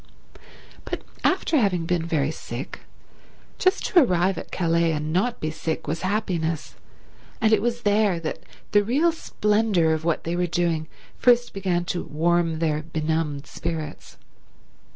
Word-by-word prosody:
But - - -5 0.2
after 315 - +2
having 185 -9 +2
been 170 -1 0
very 150 -3 +1
sick, 130 -3 -7 0.8
just 375 +1 +2
to 360 - +5
arrive 185 - +2
at - - -9
Calais 170 -1 +2
and 155 +1 -2
not 225 +7 +1
be 155 - -2
sick 160 0 -3
was 160 +3 -2
happiness, 175 -5 -1 0.7
and 220 -1 +3
it 210 - +4
was 240 +1 -1
there 205 -3 +3
that 160 -1 -4 0.3
the 205 0 +5
real 285 +10 +3
splendour 210 - +1
of 160 0 -2
what 165 -1 0
they 170 +1 -2
were 180 0 +1
doing 165 -2 0 0.3
first 240 -1 +4
began 180 -3 -1
to 175 0 -2
warm 165 +1 +1
their 155 -2 0
benumbed 155 -2 -2
spirits. 160 -3 -6
170 Hz, 150 wpm, -24 LUFS, 160-205 Hz, 0.8 s, to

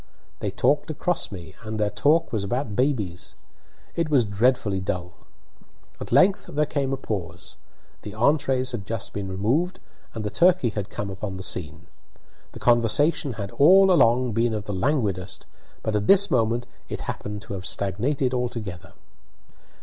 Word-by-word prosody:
They - - -2
talked - - +1
across - - -2
me, 85 -4 -9
and 110 -1 -5
their 105 -1 +1
talk 155 +9 +2
was 105 -3 0
about 115 +1 -2
babies; 110 -10 -1 0.6
it 165 -2 0
was 135 -6 +4
dreadfully 105 -1 +1
dull. 90 -2 -4 0.9
At - - -7
length 190 +1 +4
there 150 +1 0
came 140 -3 -2
a 135 - -1
pause. 90 -8 -6 0.5
The 105 0 -8
entrees 130 +1 +1
had 105 -5 -6
just 115 -2 -4
been 100 -1 -4
removed, 120 - 0 0.4
and 110 - -4
the 105 - -2
turkey 175 -7 +4
had 105 -2 -4
come 100 -1 -5
upon 95 0 -5
the 95 - -7
scene. 80 -1 -2 0.7
The - - -9
conversation 125 +5 +3
had 100 -2 -6
all 190 +6 +6
along 125 -6 +4
been 115 +1 +1
of 105 -2 -4
the 105 - -4
languidest, 100 -4 -1 0.4
but 110 - -1
at 105 0 0
this 200 0 +5
moment 120 0 +1 0.2
it - - -4
happened 105 -1 -5
to - - -7
have 95 -2 -4
stagnated 125 +7 0
altogether. 115 -8 -4
115 Hz, 160 wpm, -24 LUFS, 100-135 Hz, 0.9 s, all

